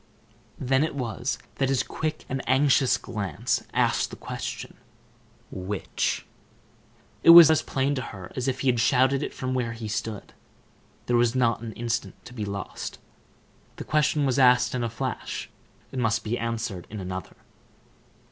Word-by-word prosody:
Then 135 +2 +2
it 155 - -2
was 125 0 -2 0.2
that 135 -1 +1
his 135 -3 +2
quick 155 -1 -4
and 135 +1 -3
anxious 135 0 +4
glance 100 -4 -2
asked - - +1
the - - -8
question: - - -6 0.7
"Which?" 95 +1 -2 1.0
It - - +4
was 170 -2 +11
as 160 - +3
plain 135 +1 0
to 130 - -2
her 95 -6 -8
as 130 0 -2
if 130 -1 -1
he 130 -2 +3
shouted 130 +3 +3
it - - -3
from 130 0 -4
where 120 -3 -1
he 115 -1 -6
stood. 105 0 -4 0.7
There 120 - +2
was 120 0 +2
not 120 -3 +2
an 115 -2 -6
instant 120 +1 -3
to 125 - -11
be 110 -4 -4
lost. 100 0 -5 0.8
The - - -7
question 150 -1 +2
was 130 0 +1
asked 125 -1 +5
in 125 -1 -1
a 120 - -1
flash; 125 +2 -4 0.4
it 130 - -4
must 110 -2 +1
be 110 +2 -1
answered 115 -6 -3
in 105 - -6
another. 95 -2 -6
125 Hz, 160 wpm, -26 LUFS, 110-135 Hz, 1.0 s, was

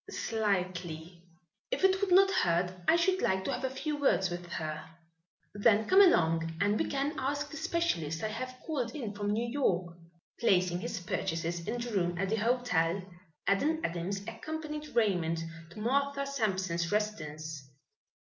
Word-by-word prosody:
"Slightly." 180 -6 -2 0.5
"If - - -2
it 380 0 +4
would 400 -2 0
not 390 +2 +7
hurt, 175 - +2
I - - +6
should 370 +2 +2
like 190 0 +1
to - - 0
have - - -4
a 265 - +1
few 290 +3 -3
words 195 -10 +2
with 175 0 -5
her." 155 -1 -4 0.7
"Then 210 +1 +4
come 385 +2 +7
along 165 - +4
and 205 +3 +2
we - - +2
can 280 +2 -1
ask 285 +2 -2
the 310 - -6
specialist 175 - -1
I 215 - 0
have 255 +4 -5
called 255 -7 -2
in 230 -8 -4
from 205 0 -3
New 225 +3 0
York." 185 -10 0 0.4
Placing 180 -6 +3
his 185 - -4
purchases 170 0 -2
in 240 +3 -2
the 240 -1 -4
room 175 -3 0
at 195 +2 -1
the 220 - +1
hotel, 205 -7 +1 0.4
Adam 295 +11 +2
Adams 175 +4 -2
accompanied 300 +5 -6
Raymond 175 -7 +2 0.3
to 170 - -11
Martha 280 +4 +1
Sampson's 190 -10 -1
residence. 155 -9 -3
210 Hz, 160 wpm, -31 LUFS, 175-275 Hz, 0.7 s, not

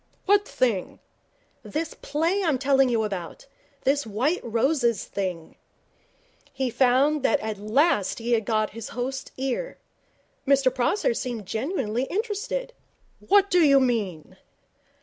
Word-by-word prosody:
'What 405 +1 +3
thing?' 230 -8 -1 0.6
'This 315 +1 -4
play 330 +7 0
I'm 315 -7 +2
telling 270 0 +3
you 230 -2 +1
about. 190 -2 -5 0.4
This 285 +2 +2
White 255 - 0
Roses 235 -1 +1
thing.' 180 -5 -5 0.9
He 265 -2 -2
found 270 +5 +3
that 255 - +2
he - - -7
had 215 -1 -3
at 200 - -12
last 220 - +2 0.2
got 215 -1 0
his 230 0 -8
host's 265 +2 -4
ear. 270 - -3 0.7
Mr 270 -2 +4
Prosser 395 - +1
seemed 240 - -4
genuinely 245 - -2
interested. 465 - -3 0.5
'What 400 0 +3
do 360 - +4
you 280 -4 +6
mean?' 215 - -2
260 Hz, 130 wpm, -25 LUFS, 220-315 Hz, 0.9 s, you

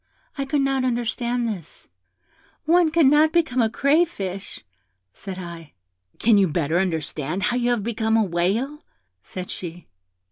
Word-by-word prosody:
I 275 - -2
could 285 +1 0
not 270 -1 +1
understand 240 0 -1
this. 185 -8 -7 0.8
'One 340 +1 +4
cannot 310 -1 +4
become 315 -7 +2
a 225 - +2
crayfish,' 225 - 0 0.5
said 190 -2 -8
I. 170 -4 -9 0.4
'Can 220 -2 +4
you 195 - +4
better 160 +1 0
understand 160 -1 -2
how 240 - +1
you 245 0 +1
have 240 -4 0
become 225 0 0
a 220 - +4
whale?' 205 - -1 0.4
said 185 - -7
she. 175 -1 -7
225 Hz, 140 wpm, -23 LUFS, 180-270 Hz, 0.8 s, One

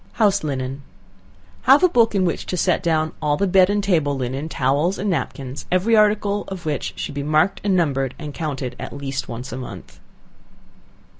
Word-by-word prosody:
House 200 -4 +2
Linen. 135 -2 -3 0.9
Have - - +7
a - - +8
book 230 - +3
in 190 -2 +2
which 170 - -2
to 180 - -2
set 180 +1 +2
down 160 -3 +1
all 145 -1 +1
the 200 - +1
bed 185 0 +5
and 205 0 +1
table 155 -8 +1
linen, 135 +4 -3
towels 145 +7 +1
and 200 0 -1
napkins; 135 -3 -4
every 190 +6 +3
article 205 -1 +2
of 185 -3 -7
which 150 -2 -2
should - - -5
be 140 - -3
marked 155 +6 +1
and 200 -2 +2
numbered, 135 -7 0
and 150 -2 -7
counted 140 -6 -4
at - - -6
least 135 -2 -4
once 125 +3 -6
a 125 - -5
month. 130 - -9
155 Hz, 190 wpm, -21 LUFS, 135-195 Hz, 0.9 s, a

